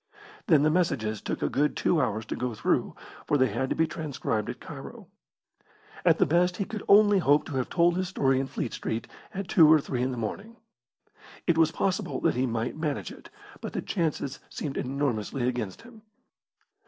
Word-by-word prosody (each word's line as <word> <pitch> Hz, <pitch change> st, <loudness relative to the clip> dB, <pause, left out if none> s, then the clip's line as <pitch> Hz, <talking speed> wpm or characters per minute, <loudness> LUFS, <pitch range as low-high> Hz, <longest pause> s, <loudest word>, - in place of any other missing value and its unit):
Then 155 Hz, -4 st, +5 dB
the 155 Hz, -, +4 dB
messages 110 Hz, -, 0 dB
took -, -, -3 dB
a -, -, +2 dB
good 150 Hz, +2 st, 0 dB
two 165 Hz, -, +2 dB
hours 110 Hz, -3 st, -1 dB
to -, -, -4 dB
go 125 Hz, -2 st, -3 dB
through, 110 Hz, -, 0 dB, 0.3 s
for 145 Hz, -, +3 dB
they 130 Hz, -2 st, +3 dB
had 125 Hz, +5 st, -2 dB
to -, -, 0 dB
be 160 Hz, -, +3 dB
transcribed 140 Hz, -9 st, -3 dB
at -, -, -6 dB
Cairo. -, -, -10 dB, 0.9 s
At -, -, +5 dB
the -, -, +4 dB
best 180 Hz, +4 st, +2 dB
he 200 Hz, -, -1 dB
could 215 Hz, 0 st, -6 dB
only 205 Hz, -1 st, +6 dB
hope 145 Hz, -3 st, +3 dB
to 140 Hz, -, -4 dB
have 130 Hz, -, -1 dB
told 170 Hz, 0 st, +3 dB
his 185 Hz, 0 st, -1 dB
story 135 Hz, -8 st, +1 dB
in 135 Hz, -, -2 dB
Fleet 120 Hz, -, -4 dB
Street 110 Hz, +1 st, -3 dB, 0.2 s
at 195 Hz, -3 st, -5 dB
two 160 Hz, -3 st, +6 dB
or 160 Hz, -, +7 dB
three 130 Hz, -3 st, -3 dB
in 130 Hz, -, +1 dB
the 125 Hz, -, -4 dB
morning. 200 Hz, -, -5 dB, 0.9 s
It 170 Hz, -, +3 dB
was 160 Hz, 0 st, +4 dB
possible 190 Hz, 0 st, -1 dB
that 165 Hz, -, +2 dB
he 130 Hz, +1 st, 0 dB
might 115 Hz, 0 st, -2 dB
manage 150 Hz, -, -3 dB
it, -, -, -13 dB, 0.3 s
but -, -, -6 dB
the -, -, -2 dB
chances 155 Hz, -6 st, -2 dB
seemed 145 Hz, -4 st, -5 dB
enormously 130 Hz, -2 st, -1 dB
against 120 Hz, -6 st, -3 dB
him. 230 Hz, -2 st, -15 dB
145 Hz, 200 wpm, -27 LUFS, 125-175 Hz, 0.9 s, or